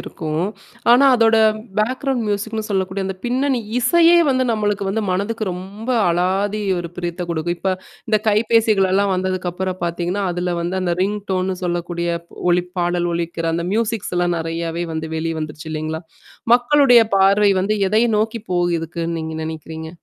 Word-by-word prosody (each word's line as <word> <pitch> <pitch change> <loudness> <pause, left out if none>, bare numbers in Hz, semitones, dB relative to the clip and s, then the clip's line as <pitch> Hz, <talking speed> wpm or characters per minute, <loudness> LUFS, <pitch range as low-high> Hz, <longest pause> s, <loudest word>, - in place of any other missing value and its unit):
இருக்கும். 155 +2 -3 0.5
ஆனா, 250 +3 +6
அதோட 225 -1 +4 0.4
பேக்கிரவுண்ட் 255 +2 0
மியூசிக்ன்னு 215 +2 -2
சொல்லக்கூடிய 190 0 -1
அந்த 190 - -4
பின்னணி 255 +1 0 0.2
இசையே 335 +8 +5
வந்து 255 0 +2
நம்மளுக்கு 205 -2 -1
வந்து 220 +3 -1
மனதுக்கு 205 +5 -1
ரொம்ப 195 +6 -8 0.2
அலாதி 195 +4 0 0.2
ஒரு 170 -1 -4
பிரியத்த 175 0 -3
குடுக்கும். 170 +1 -2
இப்போ 190 +1 0 0.4
இந்த 215 -1 +3
கைபேசிகள் 215 -2 +3
எல்லாம் 200 0 +2
வந்ததுக்கப்புறம் 185 0 -2
பாத்தீங்கன்னா, 175 +3 -2
அதில 175 0 -2
வந்து 175 +2 -2
அந்த 175 -2 0
ரிங்டோன்ன்னு 190 -2 -1
சொல்லக்கூடிய 175 0 -2 0.4
ஒலிப் 180 0 0
பாடல் 175 0 0
ஒலிக்கிற 170 0 -2
அந்த 170 0 -2
மியூசிக்ஸ்லாம் 185 -6 0
நெறையாவே 165 +1 -3
வந்து 160 0 -3
வெளி 165 +1 -2
வந்துருச்சு 155 +1 -6
இல்லைங்களா! 155 +1 -4 0.5
மக்களுடைய 245 0 +5 0.2
பார்வை 200 +2 +4
வந்து 210 +3 0
எதை 215 +3 +3 0.2
நோக்கி 220 +2 -1
போய் 175 -1 +1
இருக்குன்னு 165 0 -4
நீங்க 160 0 -5
நெனைக்கிறீங்க? 160 0 -6
185 Hz, 145 wpm, -20 LUFS, 170-215 Hz, 0.5 s, ஆனா